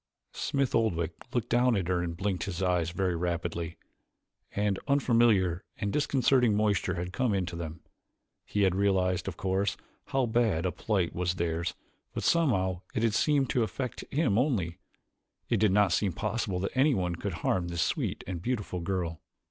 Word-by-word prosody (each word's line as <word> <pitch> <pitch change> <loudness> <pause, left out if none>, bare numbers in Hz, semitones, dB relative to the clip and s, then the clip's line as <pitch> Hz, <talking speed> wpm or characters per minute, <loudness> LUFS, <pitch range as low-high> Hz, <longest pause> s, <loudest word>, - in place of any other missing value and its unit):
Smith 140 -2 -1
Oldwick 85 -7 +1 0.2
looked 120 -4 -1
down 120 0 +3
at 95 -4 -1
her 90 -1 +1
and 85 -1 -3
blinked 95 -3 -1
his 90 -3 -4
eyes 90 -3 +1
very 90 0 0
rapidly. 85 -1 -2 0.8
An 100 -1 +1
unfamiliar 115 - +3
and 100 -1 -2
disconcerting 130 -5 +3
moisture 100 -3 +1
had 90 +1 -4
come 125 -4 +1
into 90 -3 -2
them. 85 -1 -6 0.6
He 105 - 0
had 95 -2 +4
realized, 95 -2 +1
of - - -4
course, 95 +1 0 0.3
how 135 -1 +1
bad 110 -7 +1
a 90 - +1
plight 95 -1 -1
was 90 0 -1
theirs 85 -1 -1 0.4
but - - -2
somehow 95 - +2
it 110 - +1
had 115 -2 +2
seemed 140 +1 +2
to 125 - +2
affect 125 +2 -3
him 130 -8 +2
only: 95 - 0 0.7
it 115 - +3
did 105 -1 +3
not 100 -2 +4
seem 95 +1 +1
possible 100 0 -2
that 100 - -2
anyone 125 - +2
could 95 +2 -4
harm 90 -2 +1
this 85 -1 0
sweet - - -2
and 90 -3 -4
beautiful 105 -5 -2
girl. 85 -3 -2
95 Hz, 170 wpm, -29 LUFS, 85-115 Hz, 0.8 s, had